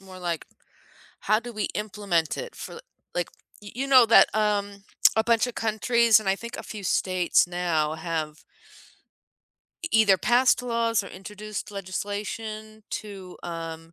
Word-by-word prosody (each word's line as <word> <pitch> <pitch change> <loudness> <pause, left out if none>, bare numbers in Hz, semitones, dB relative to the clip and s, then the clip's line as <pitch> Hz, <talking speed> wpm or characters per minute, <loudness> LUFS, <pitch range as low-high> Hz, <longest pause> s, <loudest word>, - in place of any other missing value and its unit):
more 190 -1 -12
like, 170 -3 -3 0.7
how 215 +1 +2
do 240 +1 -8
we 215 -2 -3
implement 200 -6 -1
it - - -6
for - - -8
l 470 - -9 0.3
like, 175 -1 -2 0.3
y 205 - -9
you 265 +4 -2
know 255 -4 +7
that, 230 - +7
um, 205 -2 0 0.3
a 220 - +3
bunch 230 0 +3
of 245 - -6
countries 225 +1 +3
and 200 - -4
I 195 - +2
think 235 +3 -8
a - - -6
few 210 -3 -8
states 185 0 +2
now 170 -4 0
have 160 -2 -4 1.4
e 335 - -2
either 210 -4 +5
passed 250 +1 +3
laws 230 -2 +1
or 195 - -10
introduced 210 +2 -7
legislation 210 +3 -5
to, 195 -4 -7
um 165 -1 -7
205 Hz, 155 wpm, -26 LUFS, 180-225 Hz, 1.4 s, know